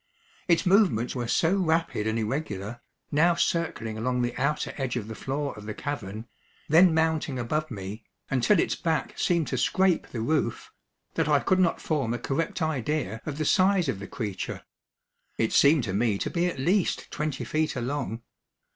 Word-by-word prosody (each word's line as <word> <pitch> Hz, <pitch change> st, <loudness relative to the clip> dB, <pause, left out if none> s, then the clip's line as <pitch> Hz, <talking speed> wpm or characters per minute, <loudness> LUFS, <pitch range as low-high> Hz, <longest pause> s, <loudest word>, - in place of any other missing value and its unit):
Its 170 Hz, +1 st, +3 dB
movements 180 Hz, -, +3 dB
were 120 Hz, -2 st, -3 dB
so 160 Hz, +9 st, +2 dB
rapid 165 Hz, -, 0 dB
and 110 Hz, +1 st, 0 dB
irregular, 110 Hz, -2 st, -3 dB, 0.3 s
now 165 Hz, +4 st, +4 dB
circling 115 Hz, -12 st, -1 dB
along 125 Hz, +2 st, 0 dB
the 120 Hz, -, -2 dB
outer 140 Hz, +4 st, -1 dB
edge 130 Hz, -4 st, -2 dB
of 110 Hz, -4 st, -3 dB
the 110 Hz, -, -6 dB
floor 140 Hz, +4 st, -3 dB
of 105 Hz, 0 st, -10 dB
the 105 Hz, -, -4 dB
cavern, 110 Hz, -7 st, -5 dB, 0.4 s
then 170 Hz, +4 st, +6 dB
mounting 160 Hz, -3 st, +1 dB
above 155 Hz, +6 st, -1 dB
me, 100 Hz, 0 st, -7 dB, 0.3 s
until 135 Hz, -, +3 dB
its -, -, +1 dB
back 165 Hz, -2 st, -1 dB
seemed 170 Hz, -3 st, +1 dB
to 130 Hz, -, -1 dB
scrape 185 Hz, +4 st, +2 dB
the 120 Hz, -, -6 dB
roof, 140 Hz, -2 st, -1 dB, 0.4 s
that -, -, 0 dB
I 145 Hz, -1 st, +5 dB
could 185 Hz, +9 st, +2 dB
not 175 Hz, -3 st, +2 dB
form 135 Hz, -7 st, -1 dB
a -, -, -2 dB
correct 165 Hz, -, -2 dB
idea 145 Hz, -7 st, -1 dB
of 145 Hz, -2 st, -3 dB
the 155 Hz, -, -1 dB
size 185 Hz, +1 st, +3 dB
of 110 Hz, -8 st, -2 dB
the 100 Hz, -, -7 dB
creature. 105 Hz, -6 st, -5 dB, 0.7 s
It 110 Hz, -, 0 dB
seemed 145 Hz, -1 st, +5 dB
to 95 Hz, -, -3 dB
me 105 Hz, 0 st, +1 dB
to -, -, -3 dB
be 175 Hz, 0 st, +1 dB
at 180 Hz, -, -3 dB
least 175 Hz, +8 st, 0 dB
twenty 150 Hz, -2 st, -3 dB
feet 155 Hz, 0 st, 0 dB
along. 125 Hz, -2 st, -3 dB
140 Hz, 180 wpm, -27 LUFS, 115-160 Hz, 0.7 s, then